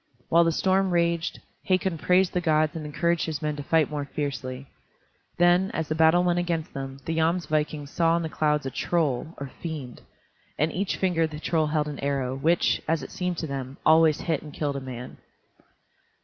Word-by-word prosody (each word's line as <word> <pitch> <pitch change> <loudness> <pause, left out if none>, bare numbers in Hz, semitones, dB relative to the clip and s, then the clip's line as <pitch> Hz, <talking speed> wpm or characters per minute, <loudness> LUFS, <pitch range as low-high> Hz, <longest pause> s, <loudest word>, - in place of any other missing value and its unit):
While 170 +1 +6
the 165 - +3
storm 190 +3 +2
raged, 170 -1 0 0.2
Hakon 185 -3 +1
praised 180 +2 +3
the 180 - 0
gods 155 -2 +2
and 155 -2 -5
encouraged 170 +3 0
his 155 -3 -3
men 150 -1 -2
to - - -4
fight 160 +1 +2
more 145 -1 -3
fiercely. 135 -2 -4 0.7
Then, 175 +2 +4
as 160 -2 -2
the - - +1
battle 160 +2 +4
went 175 0 +2
against 170 -3 -2
them, 135 0 -6
the 165 - -2
Jomsvikings 155 -3 0
saw 165 0 +2
in 170 - -2
the - - -2
clouds 150 -2 0
a 135 - -3
troll, 155 -1 -1
or 140 -2 -6
fiend. 150 -7 -6 0.6
In 155 +3 +1
each 190 +3 -2
finger 175 -4 +1
the 155 -1 -8
troll 160 -1 +1
held 150 0 0
an 145 -2 -6
arrow, 135 -2 -1
which, 165 +5 +2
as 160 -3 0
it - - -8
seemed 180 -1 -2
to 160 - -3
them, 135 -1 -5
always 160 -1 +5
hit 160 -4 -1
and 150 - -10
killed 145 -1 -2
a - - -5
man. 125 -1 -8
160 Hz, 195 wpm, -26 LUFS, 145-170 Hz, 0.7 s, While